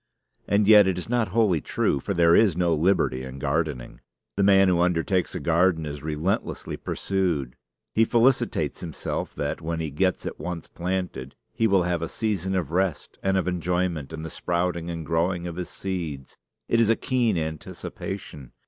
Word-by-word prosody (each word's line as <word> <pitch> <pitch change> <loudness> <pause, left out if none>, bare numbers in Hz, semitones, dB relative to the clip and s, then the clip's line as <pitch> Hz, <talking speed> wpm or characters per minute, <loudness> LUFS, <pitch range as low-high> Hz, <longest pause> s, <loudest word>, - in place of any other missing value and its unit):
And 100 0 +2
yet 105 -2 +8
it 95 -2 0
is 90 - -5
not 120 -2 +1
wholly 100 -6 +2
true; 70 - 0
for 100 +8 -3
there 85 0 +5
is 100 -7 +4
no 85 -2 +2
liberty 80 -5 +2
in 65 0 -7
gardening. 70 -3 -2 0.3
The 100 - 0
man 95 -1 +6
who 90 -2 +3
undertakes 90 +1 +1
a - - -2
garden 85 -1 +2
is 75 -1 -6
relentlessly 80 +5 -2
pursued. 85 -10 -2 0.4
He 115 - +4
felicitates 120 +3 +2
himself 85 -4 -4
that, 75 +3 -3
when 80 +1 -3
he 80 -2 -3
gets 95 +6 0
it - - -5
once 90 -2 -5
planted, 90 -7 -4 0.2
he 115 - +2
will 95 -3 +3
have 85 -1 -1
a 85 - -3
season 95 -4 -1
of 85 -5 -1
rest 90 -2 -1
and 95 0 +1
of 95 - 0
enjoyment 90 -4 -1
in 80 0 -6
the 80 - -6
sprouting 85 -1 -1
and 85 -2 -5
growing 85 +2 0
of 85 -1 -5
his 90 0 -5
seeds. 85 -8 -5 0.3
It 115 - +2
is 115 -2 +4
a 115 - +5
keen 120 -7 +1
anticipation. 80 -2 -6
90 Hz, 180 wpm, -25 LUFS, 80-95 Hz, 0.4 s, yet